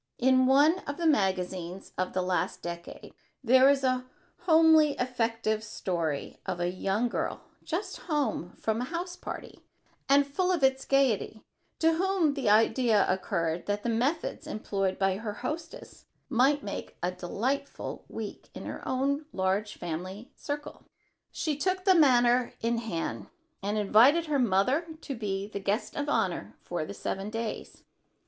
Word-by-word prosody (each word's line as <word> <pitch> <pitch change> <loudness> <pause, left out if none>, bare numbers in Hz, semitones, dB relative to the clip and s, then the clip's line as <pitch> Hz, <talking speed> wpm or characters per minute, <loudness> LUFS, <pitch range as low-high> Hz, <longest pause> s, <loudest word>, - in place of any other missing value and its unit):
In 260 0 +4
one 295 +7 +5
of 285 - -4
the 340 - -2
magazines 190 - 0
of 185 0 -2
the 185 - 0
last 180 0 -1
decade 170 0 -7 0.3
there 260 +2 +6
is 280 -1 +2
a 255 -1 +1 0.4
homely 320 -2 +6
effective 230 -4 -1
story 170 -8 -3
of 175 - -2
a 175 0 0
young 195 +5 0
girl, - - -3 0.2
just 350 +6 -3
home 290 - -2
from 220 +1 -1
a - - -1
house 350 +4 -4
party - - -8 0.5
and 280 +1 +6
full 360 +7 0
of 345 -6 0
its 265 0 +3
gaiety, 255 -5 +1 0.3
to 325 0 +3
whom 360 -3 +2
the 270 -6 0
idea 220 0 +4
occurred 170 -3 -1
that 205 0 -1
the 240 - -1
methods 280 +7 -1
employed 195 -7 -2
by 195 -1 +1
her 210 0 -4
hostess 320 +9 -7 0.2
might 275 +3 +3
make 200 - -6
a 180 - +1
delightful 240 +10 -3
week 220 -2 -7
in - - -7
her - - -6
own 280 +3 0
large 195 +3 -1
family 185 +7 -6
circle. 290 0 -6 0.5
She 310 -3 -1
took 370 +5 -1
the 380 - +7
matter 250 -6 +4
in 230 0 0
hand, 200 -8 -4 0.3
and 205 +2 -1
invited 235 +11 +5
her 295 -3 0
mother 250 - +2
to 275 - -5
be 200 -3 -3
the 205 -1 -5
guest 200 +3 -2
of 290 0 -2
honor - - -1
for - - -3
the - - -7
seven 195 +2 -4
days. 225 0 -5
240 Hz, 155 wpm, -29 LUFS, 195-285 Hz, 0.5 s, the